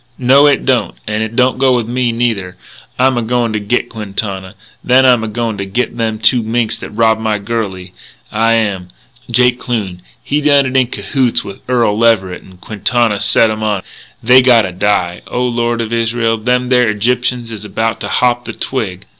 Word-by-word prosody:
No, 135 Hz, +3 st, +5 dB
it 145 Hz, -, +2 dB
don't. 125 Hz, -5 st, 0 dB
And 105 Hz, 0 st, -2 dB
it 110 Hz, +1 st, -4 dB
don't 130 Hz, 0 st, +2 dB
go 130 Hz, -1 st, +3 dB
with 120 Hz, -3 st, -1 dB
me, 125 Hz, 0 st, 0 dB
neither. 110 Hz, -6 st, -2 dB, 0.4 s
I'm 130 Hz, 0 st, +2 dB
a -, -, -1 dB
goin' 115 Hz, 0 st, -1 dB
to 105 Hz, -, -1 dB
git 115 Hz, +4 st, -1 dB
Quintana. 100 Hz, -2 st, -4 dB, 0.3 s
Then 130 Hz, +1 st, +4 dB
I'm 125 Hz, -3 st, +4 dB
a -, -, -3 dB
goin' 110 Hz, -1 st, -3 dB
to 100 Hz, -, -3 dB
git 120 Hz, +5 st, -2 dB
them 110 Hz, -2 st, -2 dB
two 110 Hz, +3 st, +3 dB
minks 115 Hz, 0 st, -1 dB
that -, -, -8 dB
robbed 110 Hz, 0 st, +1 dB
my 110 Hz, -1 st, 0 dB
girlie, 100 Hz, -4 st, -4 dB, 0.4 s
I 115 Hz, +1 st, +2 dB
am!... 100 Hz, -5 st, -1 dB, 0.4 s
Jake 125 Hz, +1 st, +2 dB
Kloon, 100 Hz, -7 st, -4 dB, 0.2 s
he 150 Hz, +1 st, -1 dB
done 145 Hz, -2 st, +4 dB
it 130 Hz, 0 st, -4 dB
in 130 Hz, -2 st, +3 dB
cahoots 120 Hz, +3 st, -1 dB
with 100 Hz, -, -10 dB
Earl 120 Hz, -5 st, +2 dB
Leverett; 100 Hz, -6 st, +1 dB
and 95 Hz, -1 st, -17 dB
Quintana 110 Hz, +2 st, 0 dB
set 110 Hz, +2 st, +3 dB
'em 110 Hz, 0 st, -4 dB
on. 105 Hz, -3 st, -1 dB, 0.4 s
And -, -, -15 dB
they 130 Hz, +1 st, +8 dB
gotta 115 Hz, -7 st, +4 dB
die, 90 Hz, -2 st, -1 dB
O 125 Hz, -, -2 dB
Lord 120 Hz, -1 st, -1 dB
of 115 Hz, 0 st, -4 dB
Israel, 115 Hz, 0 st, 0 dB
them 125 Hz, +2 st, 0 dB
there 125 Hz, -2 st, +3 dB
Egyptians 120 Hz, +2 st, -1 dB
is 110 Hz, -2 st, -7 dB
about 110 Hz, +2 st, -2 dB
to -, -, -4 dB
hop 120 Hz, -1 st, +1 dB
the -, -, -6 dB
twig.... 105 Hz, -9 st, -4 dB
115 Hz, 195 wpm, -14 LUFS, 105-125 Hz, 0.4 s, they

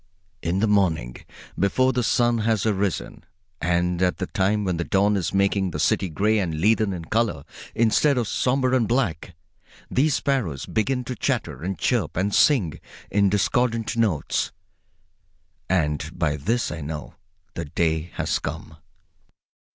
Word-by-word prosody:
In 90 Hz, +4 st, -1 dB
the 110 Hz, -, +3 dB
morning, 85 Hz, -12 st, +1 dB, 0.4 s
before 130 Hz, +8 st, +2 dB
the 125 Hz, -, +1 dB
sun 120 Hz, 0 st, +2 dB
has 110 Hz, -2 st, +1 dB
arisen, 100 Hz, -3 st, -1 dB, 0.4 s
and 90 Hz, 0 st, 0 dB
at 90 Hz, -1 st, +2 dB
the 95 Hz, -, -2 dB
time 105 Hz, +1 st, 0 dB
when 90 Hz, -3 st, -1 dB
the 85 Hz, -, -1 dB
dawn 100 Hz, +3 st, +2 dB
is 90 Hz, -5 st, -1 dB
making 100 Hz, -1 st, +1 dB
the -, -, -5 dB
city 95 Hz, -, +1 dB
gray 105 Hz, +7 st, +1 dB
and 85 Hz, -5 st, -2 dB
leaden 110 Hz, +2 st, +3 dB
in 85 Hz, -3 st, -5 dB
color 110 Hz, -7 st, 0 dB, 0.3 s
instead 120 Hz, +5 st, +3 dB
of 120 Hz, -3 st, 0 dB
somber 130 Hz, +2 st, +1 dB
and 120 Hz, -4 st, +2 dB
black, 95 Hz, -, -1 dB, 0.6 s
these 145 Hz, +2 st, +2 dB
sparrows 110 Hz, -, -1 dB
begin 125 Hz, +4 st, -1 dB
to 125 Hz, -, -5 dB
chatter -, -, -2 dB
and 95 Hz, +2 st, -3 dB
chirp 90 Hz, -, 0 dB
and 100 Hz, +2 st, 0 dB
sing 110 Hz, -, +3 dB, 0.3 s
in 100 Hz, -1 st, +3 dB
discordant 115 Hz, +3 st, 0 dB
notes, 105 Hz, -10 st, 0 dB, 1.2 s
and 75 Hz, -5 st, 0 dB
by 75 Hz, 0 st, +1 dB
this 115 Hz, -, -1 dB
I 75 Hz, +1 st, -5 dB
know 75 Hz, +1 st, -6 dB, 0.4 s
the 85 Hz, -, -4 dB
day 80 Hz, +2 st, -1 dB
has -, -, 0 dB
come. 80 Hz, +1 st, -6 dB
100 Hz, 150 wpm, -24 LUFS, 85-115 Hz, 1.2 s, the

